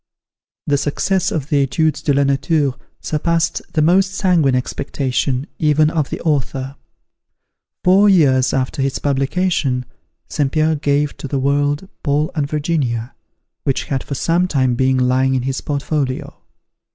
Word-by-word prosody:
The 145 Hz, -1 st, +1 dB
success 180 Hz, +6 st, 0 dB
of 150 Hz, -2 st, -3 dB
the 145 Hz, -1 st, +3 dB
"Etudes 150 Hz, +4 st, 0 dB
de 145 Hz, -, 0 dB
la 140 Hz, 0 st, +3 dB
Nature" 140 Hz, +1 st, +1 dB, 0.3 s
surpassed 165 Hz, +2 st, 0 dB
the 155 Hz, -, +2 dB
most 190 Hz, +4 st, +3 dB
sanguine 170 Hz, -10 st, +2 dB
expectation, 130 Hz, 0 st, -2 dB
even 155 Hz, 0 st, +3 dB
of 155 Hz, -4 st, -1 dB
the -, -, -4 dB
author. 135 Hz, -3 st, -1 dB, 1.1 s
Four 195 Hz, +3 st, +5 dB
years 135 Hz, -9 st, +4 dB
after 135 Hz, +2 st, -1 dB
its 135 Hz, 0 st, 0 dB
publication, 140 Hz, -2 st, 0 dB, 0.4 s
St. 145 Hz, -3 st, -1 dB
Pierre 155 Hz, +1 st, +2 dB
gave 145 Hz, 0 st, 0 dB
to -, -, -6 dB
the 135 Hz, -, -2 dB
world 145 Hz, +5 st, 0 dB
"Paul 150 Hz, +2 st, 0 dB
and 145 Hz, -4 st, -2 dB
Virginia," 145 Hz, -7 st, -1 dB, 0.5 s
which 135 Hz, -, 0 dB
had 135 Hz, -2 st, -3 dB
for 140 Hz, -, -5 dB
some 170 Hz, +6 st, +1 dB
time 130 Hz, -7 st, +1 dB
been 130 Hz, +2 st, +2 dB
lying 130 Hz, +1 st, +2 dB
in 125 Hz, -, -1 dB
his 135 Hz, +1 st, -2 dB
portfolio. 140 Hz, -2 st, -2 dB
145 Hz, 145 wpm, -18 LUFS, 135-155 Hz, 1.1 s, Four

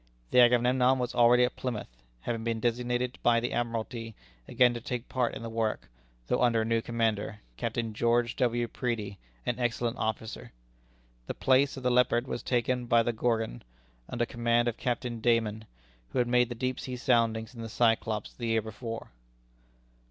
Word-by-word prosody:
The -, -, +5 dB
Agamemnon 125 Hz, +2 st, +5 dB
was 125 Hz, -1 st, -2 dB
already 120 Hz, +1 st, +5 dB
at 125 Hz, -, 0 dB
Plymouth, 105 Hz, -, -5 dB, 0.2 s
having 115 Hz, -, -3 dB
been 115 Hz, -1 st, -1 dB
designated 120 Hz, +2 st, -1 dB
by 115 Hz, -1 st, +4 dB
the 120 Hz, +1 st, -3 dB
Admiralty 115 Hz, -1 st, -3 dB, 0.3 s
again 125 Hz, -2 st, +4 dB
to 120 Hz, -, -5 dB
take 125 Hz, +1 st, -4 dB
part 125 Hz, -2 st, -1 dB
in -, -, -7 dB
the -, -, -4 dB
work, 110 Hz, -, -2 dB, 0.3 s
though 125 Hz, -, 0 dB
under 115 Hz, -2 st, +3 dB
a -, -, -3 dB
new 115 Hz, 0 st, +1 dB
commander, 110 Hz, -3 st, -1 dB
Captain 115 Hz, -, -3 dB
George 120 Hz, +1 st, +1 dB
W. 120 Hz, -2 st, +1 dB
Preedy, 110 Hz, -5 st, -3 dB, 0.3 s
an -, -, -1 dB
excellent 120 Hz, -1 st, -1 dB
officer. 110 Hz, -, -4 dB, 0.7 s
The -, -, -4 dB
place 135 Hz, +2 st, +3 dB
of 130 Hz, -, -7 dB
the 125 Hz, -, +2 dB
Leopard 125 Hz, -1 st, +3 dB
was 120 Hz, -, -4 dB
taken 125 Hz, 0 st, 0 dB
by 115 Hz, 0 st, +4 dB
the 120 Hz, -, -1 dB
Gorgon, 115 Hz, -, -1 dB, 0.5 s
under 120 Hz, 0 st, -1 dB
command 120 Hz, 0 st, +1 dB
of 120 Hz, -, 0 dB
Captain 120 Hz, -1 st, -2 dB
Dayman, 110 Hz, -2 st, +1 dB, 0.4 s
who -, -, -5 dB
had 125 Hz, -, +2 dB
made 125 Hz, 0 st, +3 dB
the 120 Hz, -, -5 dB
deep 130 Hz, +2 st, -2 dB
sea 130 Hz, -, -5 dB
soundings 115 Hz, -3 st, +1 dB
in 115 Hz, -, -9 dB
the 115 Hz, -, -6 dB
Cyclops 110 Hz, -2 st, +1 dB
the 120 Hz, -, -5 dB
year 115 Hz, -1 st, +2 dB
before. 115 Hz, +1 st, -7 dB
120 Hz, 175 wpm, -29 LUFS, 115-125 Hz, 0.7 s, The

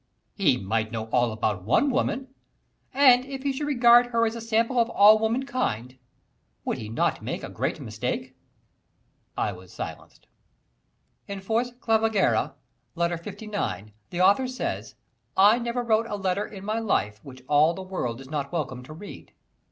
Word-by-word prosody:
"He 150 Hz, -11 st, +2 dB
might 110 Hz, +1 st, -2 dB
know 110 Hz, -1 st, -3 dB
all 120 Hz, -2 st, +2 dB
about 105 Hz, -3 st, -1 dB
one 145 Hz, -, +2 dB
woman, 265 Hz, 0 st, -1 dB, 0.6 s
and 255 Hz, -2 st, +6 dB
if 270 Hz, 0 st, -7 dB
he 280 Hz, -1 st, 0 dB
should 290 Hz, +2 st, -3 dB
regard 240 Hz, -3 st, +6 dB
her 230 Hz, -1 st, +1 dB
as 225 Hz, -, -1 dB
a 230 Hz, -, -6 dB
sample 230 Hz, +2 st, +1 dB
of 230 Hz, 0 st, +3 dB
all 215 Hz, -1 st, +7 dB
womankind, 220 Hz, -, -2 dB, 0.7 s
would -, -, -2 dB
he 105 Hz, -, -6 dB
not 115 Hz, -, 0 dB
make -, -, -4 dB
a -, -, -5 dB
great -, -, -2 dB
mistake?" -, -, -4 dB, 1.0 s
I -, -, 0 dB
was 90 Hz, -1 st, -12 dB
silenced. -, -, -8 dB, 1.0 s
In 200 Hz, -1 st, -5 dB
"Fors 230 Hz, +5 st, -1 dB
Clavigera," 220 Hz, -3 st, +2 dB, 0.4 s
Letter 170 Hz, -1 st, -1 dB
LIX, 200 Hz, -, -4 dB, 0.2 s
the 175 Hz, -, -2 dB
author 200 Hz, +8 st, +4 dB
says: 110 Hz, -, -4 dB, 0.4 s
"I 205 Hz, +5 st, +6 dB
never 240 Hz, +1 st, -2 dB
wrote 225 Hz, -1 st, +2 dB
a 210 Hz, -, -3 dB
letter 195 Hz, +1 st, -1 dB
in 195 Hz, -2 st, -10 dB
my 215 Hz, +2 st, -1 dB
life 105 Hz, -, -1 dB
which 130 Hz, -2 st, -12 dB
all 150 Hz, +3 st, +4 dB
the 190 Hz, -, -6 dB
world 130 Hz, -11 st, -4 dB
is 135 Hz, -, -11 dB
not 140 Hz, -2 st, -3 dB
welcome 135 Hz, -7 st, -3 dB
to 155 Hz, -, -10 dB
read." 200 Hz, +6 st, -11 dB
200 Hz, 165 wpm, -26 LUFS, -, 1.0 s, all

